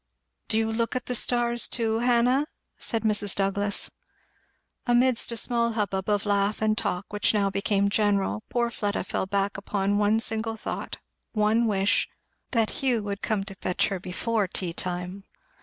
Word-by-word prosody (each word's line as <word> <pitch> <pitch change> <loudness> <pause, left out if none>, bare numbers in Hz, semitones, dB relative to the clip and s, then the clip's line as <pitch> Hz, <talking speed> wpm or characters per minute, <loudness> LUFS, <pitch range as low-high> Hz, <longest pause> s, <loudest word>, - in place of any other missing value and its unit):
"Do 220 - +1
you 225 0 +1
look 230 +1 -1
at 255 - -2
the 250 - -2
stars, 240 0 +2
too, 225 -1 0
Hannah?" 245 +4 +3 0.3
said 225 -2 -2
Mrs. 205 -2 +2
Douglass. 200 +1 +1 1.0
Amidst 245 0 +3
a 235 - -4
small 235 0 +1
hubbub 195 -3 -2
of 205 0 +1
laugh 200 0 +1
and 215 0 +2
talk 185 -1 -3
which 210 +1 +2
now 200 -1 +2
became 200 0 +1
general, 205 0 +1
poor 235 -1 0
Fleda 205 -2 -2
fell 190 - -2
back 200 +1 0
upon 200 0 0
one 210 +1 +3
single 225 0 0
thought - - -5 0.4
one 220 +2 +2
wish; 200 -1 +2 0.4
that 225 -3 +1
Hugh 245 -5 +1
would 200 -1 -4
come 215 -3 0
to 195 0 -8
fetch 185 -1 -1
her 195 - -2
home - - -13
before 205 +3 -1
tea 175 -1 -1
time. 180 +2 -3
210 Hz, 170 wpm, -26 LUFS, 200-230 Hz, 1.0 s, Hannah